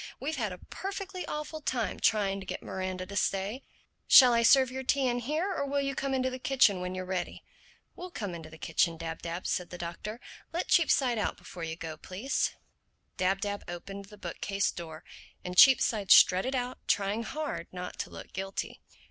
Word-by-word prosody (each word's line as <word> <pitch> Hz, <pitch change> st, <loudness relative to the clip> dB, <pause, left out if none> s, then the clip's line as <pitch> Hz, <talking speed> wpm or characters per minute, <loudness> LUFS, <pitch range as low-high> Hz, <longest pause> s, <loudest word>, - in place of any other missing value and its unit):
We've 295 Hz, +5 st, -2 dB
had 215 Hz, -6 st, -1 dB
a 180 Hz, -, -7 dB
perfectly 385 Hz, -, -6 dB
awful 300 Hz, +1 st, -5 dB
time 245 Hz, -6 st, -2 dB
trying 200 Hz, -2 st, +2 dB
to 190 Hz, -, -9 dB
get -, -, -5 dB
Miranda 185 Hz, -1 st, -4 dB
to 200 Hz, +2 st, -9 dB
stay. 200 Hz, +6 st, 0 dB, 0.5 s
Shall 250 Hz, -3 st, +9 dB
I 235 Hz, -, +4 dB
serve 260 Hz, +2 st, +6 dB
your 265 Hz, +1 st, -4 dB
tea 265 Hz, 0 st, +1 dB
in 245 Hz, 0 st, 0 dB
here, 310 Hz, -, -1 dB
or 280 Hz, -, -1 dB
will 280 Hz, +1 st, 0 dB
you 275 Hz, 0 st, -1 dB
come 270 Hz, 0 st, -1 dB
into 260 Hz, 0 st, 0 dB
the 255 Hz, -, -6 dB
kitchen 245 Hz, -8 st, +3 dB
when 180 Hz, 0 st, -4 dB
you're 185 Hz, 0 st, -4 dB
ready?" 185 Hz, -1 st, -4 dB, 0.5 s
"We'll 360 Hz, +1 st, -7 dB
come 205 Hz, -, -5 dB
into 165 Hz, -2 st, -8 dB
the 160 Hz, -, -12 dB
kitchen, 165 Hz, +1 st, +1 dB
Dab 165 Hz, 0 st, -5 dB
Dab," 170 Hz, +2 st, -5 dB
said 180 Hz, -1 st, -1 dB
the 180 Hz, -, -8 dB
Doctor. 175 Hz, +6 st, -6 dB, 0.3 s
"Let 340 Hz, +2 st, -3 dB
Cheapside 265 Hz, -8 st, +3 dB
out -, -, -1 dB
before 175 Hz, -, -9 dB
you 160 Hz, 0 st, -4 dB
go, 160 Hz, -2 st, -7 dB
please." 200 Hz, -, -2 dB, 0.6 s
Dab 195 Hz, +1 st, +1 dB
Dab 205 Hz, -1 st, -3 dB
opened 195 Hz, +3 st, -7 dB
the 210 Hz, +1 st, -14 dB
bookcase 195 Hz, +2 st, -2 dB
door 160 Hz, -1 st, -8 dB, 0.4 s
and 180 Hz, 0 st, -4 dB
Cheapside 220 Hz, -3 st, +6 dB
strutted 190 Hz, +9 st, +6 dB
out 250 Hz, 0 st, -3 dB
trying 205 Hz, +2 st, +1 dB
hard 300 Hz, +6 st, -4 dB
not 180 Hz, 0 st, -7 dB
to -, -, -3 dB
look -, -, -11 dB
guilty. 195 Hz, 0 st, -4 dB
205 Hz, 195 wpm, -30 LUFS, 185-265 Hz, 0.6 s, Shall